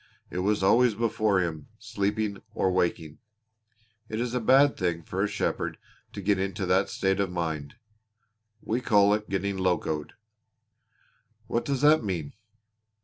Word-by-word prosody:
It 90 - -3
was 100 +1 +1
always 120 +3 +4
before 110 -3 +1
him, 80 -3 -4
sleeping 105 -2 -2
or 95 - +1
waking. 85 -4 -1 0.9
It 110 - -3
is 120 0 -2
a 125 - +1
bad 135 +5 +5
thing 85 -2 -2
for 95 +4 -3
a - - +2
shepherd 100 0 -2 0.4
to 100 - -7
get 100 0 +2
into 95 +1 -2
that 95 +2 +2
state 95 0 0
of 95 -2 0
mind. 80 -5 -3 0.9
We 115 +3 -1
call 105 -4 +4
it 105 0 -2
getting 100 0 -1
locoed." 90 -5 -1 1.3
"What 115 +1 -2
does 140 -2 -1
that 150 -1 +5
mean?" 85 -8 -3
100 Hz, 145 wpm, -27 LUFS, 90-110 Hz, 1.3 s, bad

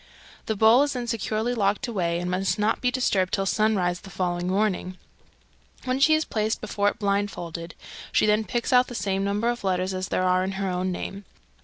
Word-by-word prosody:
The 220 - 0
bowl 220 +5 +6
is 290 0 +1
then 250 -2 -3
securely 230 0 -1
locked 210 +3 0
away, 175 -7 -1
and 180 +1 -3
must 190 +3 0
not 215 +2 +1
be 250 - +2
disturbed 205 -7 +1
till 195 - -1
sunrise 190 -4 +1
the 195 - -12
following 175 -1 -2
morning, 185 -1 0 0.9
when 255 +1 0
she 310 +3 +5
is 310 - 0
placed 215 0 -1
before 205 -1 0
it - - -8
blindfolded. 185 -5 -2 0.4
She - - +3
then 215 +1 +3
picks 240 +2 -2
out 250 0 +5
the 245 - -8
same 195 -2 -1
number 205 +3 0
of 240 -1 -1
letters 185 0 0
as 185 0 -3
there - - 0
are 185 0 +3
in 190 +1 -3
her 195 0 -2
own 180 +1 -1
name. 195 +2 -6
200 Hz, 205 wpm, -25 LUFS, 185-225 Hz, 0.9 s, bowl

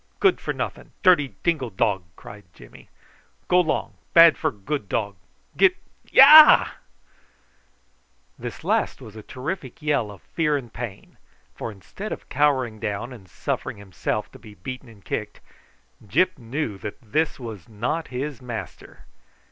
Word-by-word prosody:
Good 390 -2 +3
for - - -2
nothing, - - -6
dirty 150 - +4
dingo 155 -8 0
dog," 95 -1 0
cried 105 0 -12
Jimmy. - - -16 0.6
"Go 180 0 +5
long, 160 -3 -2 0.2
bad 165 -1 +9
for 155 - 0
good 105 +1 -5
dog. 100 -3 -2 0.4
Get 370 -1 +4 0.3
yah!" 300 +3 +9 1.7
This - - -8
last - - 0
was 110 -5 -12
a 110 - -8
terrific 130 - -6
yell 145 -8 0
of 100 -3 -13
fear 150 -3 0
and 120 -5 -9
pain, 115 -5 -8 0.4
for 115 - -6
instead 195 - -9
of - - -7
cowering 130 -6 +1
down 105 +5 -4
and 100 -7 -14
suffering - - -4
himself 100 +1 -4
to - - -14
be 105 -3 -14
beaten 130 +6 -8
and 100 -6 -18
kicked, - - -4 0.7
Gyp 185 - +2
knew 115 -3 -4
that 105 +2 -7
this 145 +7 -1
was 110 -7 -8
not 120 +10 -3
his 130 0 -5
master. 120 -3 -8
125 Hz, 145 wpm, -24 LUFS, 105-155 Hz, 1.7 s, bad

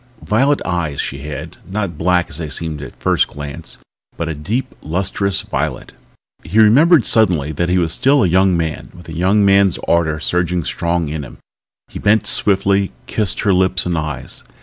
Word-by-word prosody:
Violet 135 +7 +2
eyes 80 -5 -2
she 70 - -3
had, 75 +2 -7
not 100 -4 -3
black 90 +2 +1
as 80 - -8
they 80 -3 -4
seemed 80 -1 -4
at 65 - -10
first - - +2
glance 75 -1 -8 0.4
but 85 - -3
a 80 - -2
deep, 110 - -3
lustrous 95 +3 -1
violet. - - -3 0.5
He 105 - -3
remembered 135 +8 +6
suddenly 90 -10 +2
that 85 +3 -1
he 90 - +2
was 85 -2 +1
still 140 +6 +3
a - - +3
young 95 +1 +3
man, 80 -2 -3
with 90 -1 -14
a - - -7
young 95 +5 +3
man's 100 -2 +4
ardor 80 -2 +1
surging 90 +2 -1
strong 85 +1 -1
in 75 +1 -4
him. 65 - -10 0.5
He - - -8
bent 105 0 +2
swiftly, 100 -1 +1
kissed 105 -5 -1
her 100 -2 +2
lips 95 0 +2
and 90 -1 -1
eyes. 75 -4 -5
90 Hz, 180 wpm, -17 LUFS, 80-100 Hz, 0.5 s, remembered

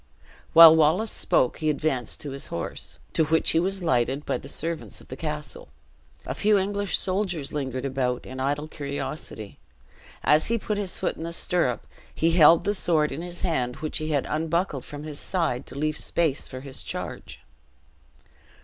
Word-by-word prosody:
While 165 -1 +11
Wallace 160 +8 +3
spoke, 125 - +1
he 155 -1 +1
advanced 140 -4 -1
to 145 - -5
his 135 0 -5
horse, 85 - -6 0.2
to 160 - +3
which 160 +1 +3
he 165 - +3
was 190 +2 -2
lighted 130 0 +1
by - - -1
the - - -11
servants 165 -1 -4
of - - -16
the 130 - -6
castle. 150 0 -6 0.6
A - - -3
few 210 0 +3
English 200 0 0
soldiers 185 -6 -2
lingered 130 -3 -3
about 130 -2 -1
in 130 +1 -8
idle 145 +3 -1
curiosity. 140 -7 -6 0.6
As 150 +1 +4
he 230 - +1
put 210 -1 -2
his 195 -3 -2
foot - - -2
in - - -6
the 165 - -4
stirrup, 170 -8 0 0.3
he 165 +1 +2
held 165 -1 +6
the 205 - +2
sword 160 -6 +2
in 140 +4 -5
his 175 0 -8
hand, 125 -9 -1
which 155 -1 -4
he 155 0 -3
had 145 -3 +1
unbuckled 160 -2 -1
from 145 0 -8
his 150 -2 -6
side 160 -9 -1
to - - -9
leave 155 +1 -1
space 160 -5 0
for 130 -1 -8
his 135 -1 -8
charge. - - -6
155 Hz, 180 wpm, -25 LUFS, 140-170 Hz, 0.6 s, While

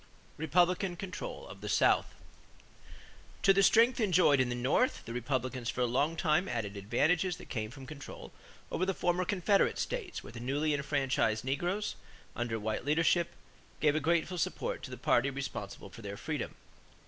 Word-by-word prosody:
=Republican 175 +4 +2
Control 195 - -6
of - - -11
the - - -5
South.= - - +4 1.4
To 195 - +7
the 195 - +4
strength 235 +5 +5
enjoyed 180 - +4
in 130 -1 +2
the 120 - -1
North, 130 - +1
the 115 - -6
Republicans 125 0 -2
for - - -2
a - - +4
long 140 +7 +1
time 165 +2 +2
added 110 -4 -2
the 100 - -6
advantages 160 - +1
that - - -12
came 110 -3 -3
from 130 +2 -10
control 145 -1 -9 0.4
over 180 - -1
the 190 0 0
former 180 +1 +1
Confederate 200 +1 +2
states 470 -7 -3
where 105 - -11
the 120 - -7
newly 145 +5 0
enfranchised 135 -6 0
negroes, 175 +10 -1 0.4
under 115 -2 -2
white 110 +2 -2
leadership, 165 +4 +2 0.5
gave 150 -2 +4
a 155 - +1
grateful 170 +3 +1
support - - -2
to - - -7
the - - -7
party 125 +3 +2
responsible 105 -8 -6
for 115 - -11
their 100 -1 -6
freedom. - - -4
145 Hz, 170 wpm, -32 LUFS, 120-180 Hz, 1.4 s, To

